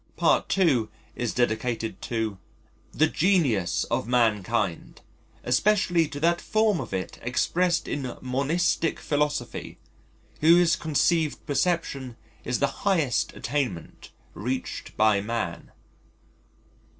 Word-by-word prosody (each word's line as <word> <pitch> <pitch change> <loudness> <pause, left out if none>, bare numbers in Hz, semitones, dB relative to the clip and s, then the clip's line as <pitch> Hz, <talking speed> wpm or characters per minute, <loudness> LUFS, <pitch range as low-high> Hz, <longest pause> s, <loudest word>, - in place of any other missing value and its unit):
Part - - +2
II. 140 - +3 0.3
is 120 -2 -2
dedicated 115 -1 -1
to: 110 -4 -3 0.5
"The 155 - +3
genius 145 - +1
of - - 0
mankind, 110 -5 0 0.4
especially 175 +4 +2
to 145 -1 -7
that 170 +1 +2
form 215 -4 +1
of - - -8
it 95 -3 -4
expressed 170 +8 0
in 130 -4 -4
monistic 150 +6 0
philosophy, 150 0 -2 0.6
whose 170 +1 +5
conceived 160 0 0
perception 140 -5 -1 0.3
is 125 - -1
the 140 -1 -2
highest 165 - +1
attainment 130 - -4 0.2
reached 125 +5 -5
by 105 -2 +4
man." 105 -5 -4
135 Hz, 100 wpm, -26 LUFS, 115-165 Hz, 0.6 s, whose